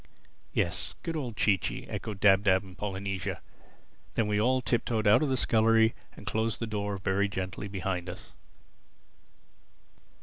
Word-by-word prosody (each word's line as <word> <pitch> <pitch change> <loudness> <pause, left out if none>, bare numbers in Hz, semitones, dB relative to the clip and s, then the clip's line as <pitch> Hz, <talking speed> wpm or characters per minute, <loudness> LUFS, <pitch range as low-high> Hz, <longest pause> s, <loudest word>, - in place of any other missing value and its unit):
"Yes—good 125 - -2
old 125 -8 -4
Chee 100 -3 +3
Chee!" - - -4
echoed 105 -3 -5
Dab 100 -1 +5
Dab 95 -1 +4
and 95 -2 -13
Polynesia. 95 -1 -3 0.8
Then 110 - +2
we 105 0 +1
all 130 +3 +3
tip 120 -1 0
toed 110 -2 -1
out 105 +7 +6
of 150 - +1
the 130 - +1
scullery 110 -1 +4 0.2
and - - -12
closed 110 +1 -1
the 115 - -1
door 105 -2 -2
very 95 +1 +1
gently 95 +1 -4
behind 95 -2 -3
us. 85 - -9
105 Hz, 155 wpm, -29 LUFS, 95-115 Hz, 0.8 s, out